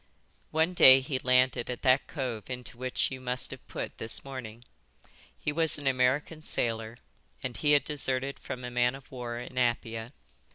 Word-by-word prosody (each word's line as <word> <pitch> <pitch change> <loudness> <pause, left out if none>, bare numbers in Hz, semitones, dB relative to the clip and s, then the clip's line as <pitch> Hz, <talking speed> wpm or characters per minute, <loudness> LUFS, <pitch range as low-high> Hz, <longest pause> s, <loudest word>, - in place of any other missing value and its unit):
"One 160 +3 +1
day 130 -6 +9
he 130 0 -3
landed 125 -1 +3
at 125 - -5
that 130 +1 +4
cove 125 -7 -4
into 125 -1 -6
which 130 +2 -1
you 130 -1 -6
must 125 0 -2
have - - -10
put - - -6
this 115 +3 -2
morning. 120 -4 -8 0.7
He - - -2
was 160 +1 +1
an 145 - -9
American 135 +4 +1
sailor, 115 -5 -1 0.5
and 130 -2 -4
he 150 -1 +3
had 145 - +5
deserted 135 -2 -1
from 125 - -7
a 125 - -5
man 125 +1 +2
of 135 0 -14
war 120 -2 -5
in 125 +1 -5
Apia. 115 -1 -1
130 Hz, 175 wpm, -29 LUFS, 120-135 Hz, 0.7 s, day